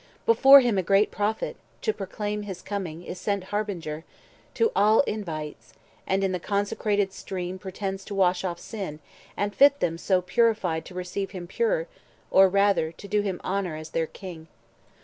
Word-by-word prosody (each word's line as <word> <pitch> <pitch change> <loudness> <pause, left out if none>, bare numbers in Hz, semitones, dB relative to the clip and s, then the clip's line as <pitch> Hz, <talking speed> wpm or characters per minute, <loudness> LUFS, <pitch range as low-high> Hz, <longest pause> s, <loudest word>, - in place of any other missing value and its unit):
Before 280 -11 +8
him 235 -6 +1
a - - +2
great 195 +4 +3
Prophet, 210 +1 -2 0.3
to 435 - +1
proclaim 210 - -4
70 205 - -7
His 190 -3 -6
coming, 185 -5 -5
is 180 - -7
sent 200 -2 -1
harbinger, 185 -6 -4 0.5
who 455 0 +3
all 215 +2 +5
Invites, 165 - -5 0.3
and 195 +1 +1
in 190 - +1
the 180 - -2
consecrated 205 0 0
stream 185 0 -5
Pretends 195 0 -5
to 205 - -6
wash 185 -1 +2
off 175 -2 -2
sin, 190 -9 -6 0.4
and 205 0 -1
fit 280 +6 +5
them 165 0 -1
so 185 0 +2
Purified 180 -4 +1
to 180 - -11
receive 180 +2 -3
him 175 - -6
pure, 475 - 0 0.5
or 190 0 +7
rather 200 -4 +2
To 200 - -12
do 210 +1 +1
him 195 -3 -3
honour 185 -4 -2
as 155 0 -8
their 165 -1 0
King. 170 -4 -10
195 Hz, 175 wpm, -26 LUFS, 180-210 Hz, 0.5 s, Before